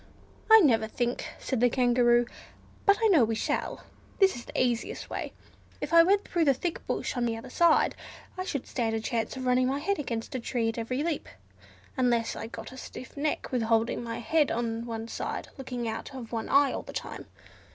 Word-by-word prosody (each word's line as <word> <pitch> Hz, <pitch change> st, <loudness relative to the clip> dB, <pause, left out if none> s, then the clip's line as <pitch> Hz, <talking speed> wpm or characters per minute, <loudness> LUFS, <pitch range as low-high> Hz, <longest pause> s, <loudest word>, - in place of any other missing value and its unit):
"I 445 Hz, 0 st, +10 dB
never 225 Hz, -, +4 dB
think," 240 Hz, +2 st, -2 dB
said 260 Hz, -, -2 dB
the 245 Hz, +1 st, +5 dB
Kangaroo, 240 Hz, -1 st, +3 dB, 0.6 s
"but 400 Hz, 0 st, +6 dB
I -, -, +6 dB
know 325 Hz, -10 st, +6 dB
we 225 Hz, 0 st, 0 dB
shall. -, -, -2 dB, 0.3 s
This 390 Hz, -1 st, +4 dB
is 240 Hz, -, -8 dB
the -, -, -4 dB
easiest 240 Hz, -2 st, -1 dB
way. -, -, -4 dB, 0.5 s
If 305 Hz, -, -4 dB
I 335 Hz, -, +9 dB
went 395 Hz, +4 st, +3 dB
through 340 Hz, -3 st, +1 dB
the 275 Hz, -2 st, +4 dB
thick 335 Hz, +6 st, -3 dB
bush -, -, -2 dB
on 245 Hz, -, 0 dB
the 225 Hz, -1 st, -2 dB
other 250 Hz, +3 st, -9 dB
side, 340 Hz, +1 st, +4 dB, 0.4 s
I 370 Hz, -, -3 dB
should 280 Hz, -8 st, -3 dB
stand 225 Hz, -2 st, -1 dB
a -, -, 0 dB
chance 225 Hz, +3 st, -2 dB
of 260 Hz, -, -4 dB
running 250 Hz, 0 st, +3 dB
my 270 Hz, +2 st, 0 dB
head 330 Hz, +5 st, -1 dB
against 230 Hz, -5 st, -4 dB
a 260 Hz, -, -2 dB
tree 230 Hz, -1 st, -1 dB
at 225 Hz, -, -4 dB
every 255 Hz, +5 st, -2 dB
leap, 325 Hz, -3 st, -2 dB, 0.7 s
unless 240 Hz, -3 st, +1 dB
I 225 Hz, -, -5 dB
got 230 Hz, -, -8 dB
a 260 Hz, -, -11 dB
stiff 255 Hz, -, -9 dB
neck 295 Hz, +1 st, -2 dB
with 250 Hz, -2 st, +1 dB
holding 225 Hz, +1 st, +1 dB
my 230 Hz, 0 st, -4 dB
head 290 Hz, +6 st, +2 dB
on 230 Hz, 0 st, -2 dB
one 225 Hz, -1 st, -4 dB
side -, -, -4 dB
looking 250 Hz, -3 st, -4 dB
out 225 Hz, +5 st, -5 dB
of 240 Hz, -4 st, -8 dB
one 225 Hz, -2 st, -3 dB
eye 280 Hz, -1 st, +4 dB
all -, -, -3 dB
the -, -, -11 dB
time. -, -, -6 dB
245 Hz, 215 wpm, -28 LUFS, 230-285 Hz, 0.7 s, I